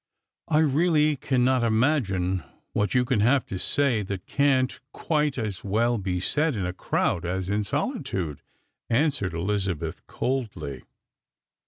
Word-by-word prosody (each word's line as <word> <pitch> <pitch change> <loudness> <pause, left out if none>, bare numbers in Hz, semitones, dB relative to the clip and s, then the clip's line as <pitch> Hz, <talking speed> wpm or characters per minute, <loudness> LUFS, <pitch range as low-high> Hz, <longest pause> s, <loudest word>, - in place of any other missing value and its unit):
" - - -64
I - - +5
really 155 0 +3
cannot 130 -1 +2
imagine 110 - +1 0.3
what 105 - +1
3'ou 125 -1 +2
can 120 -2 +1
have 125 +6 +3
to 95 - -5
say 130 -3 +1
that 95 -2 -5
can't 135 -2 +2
quite 150 -3 0
as 105 -6 -3
well 115 +4 +1
be 90 -2 -2
said 150 - +1
in 100 -4 -2
a 90 - -2
crowd 90 -1 0
as 95 +1 -2
in 105 +1 +1
solitude," 135 - -2 0.5
answered 120 - +1
Elizabeth 90 -3 -2
coldly. 95 - -3
115 Hz, 140 wpm, -26 LUFS, 95-140 Hz, 0.5 s, I